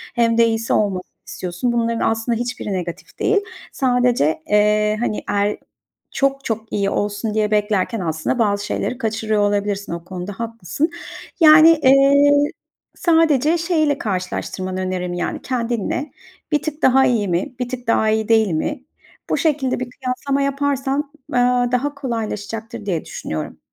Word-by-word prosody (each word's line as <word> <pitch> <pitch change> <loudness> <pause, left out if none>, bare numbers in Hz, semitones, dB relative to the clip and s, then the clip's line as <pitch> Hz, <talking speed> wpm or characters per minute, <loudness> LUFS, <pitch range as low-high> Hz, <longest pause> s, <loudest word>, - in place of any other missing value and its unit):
hem 230 -1 +2
de 230 - +6
iyisi 225 0 -1
olmasını 195 -4 0 0.2
istiyorsun. 180 +7 -3
Bunların 230 -1 +1
aslında 225 +1 -1
hiçbiri 240 -3 -4
negatif 175 -2 -6
değil. 425 - +2 0.3
Sadece, 245 - +1
eee, 210 0 +3
hani 230 -3 -2
el 205 +1 +1 0.5
çok 275 0 0
çok 220 -1 -4
iyi 200 -1 0
olsun 205 +2 -2
diye 215 -1 +1
beklerken 210 0 0
aslında 160 +7 -2
bazı 205 -3 +1
şeyleri 250 - -2
kaçırıyor 220 -2 -1
olabilirsin 205 -1 -1
o 170 0 -5
konuda 180 +2 -6
haklısın. 230 - -3 0.5
Yani, 315 0 +9
eee, 275 +2 +6 0.6
sadece 325 -2 +3
şeyiyle 315 -4 +1
karşılaştırmanı 185 -1 -3
öneririm, 185 -1 -3
yani, 175 -1 -3
kendinle, 240 +2 -2 0.4
bir 295 -1 +2
tık 310 0 -5
daha 265 +1 +5
iyi 225 -6 +1
mi, 180 +7 -1
bir 250 -1 -2
tık 250 -1 -6
daha 220 -1 +2
iyi 220 0 0
değil 220 -3 +4
mi 265 - -2 0.5
bu - - +2
şekilde 275 -6 0
bir 255 - -3
kıyaslama 270 +2 -2
yaparsan, 280 0 -1 0.2
aaa, 245 0 +2
daha 280 +4 0
kolaylaşacaktır 225 -5 -5
diye 175 -5 -1
düşünüyorum. 80 -1 -6
230 Hz, 145 wpm, -20 LUFS, 205-265 Hz, 0.6 s, Yani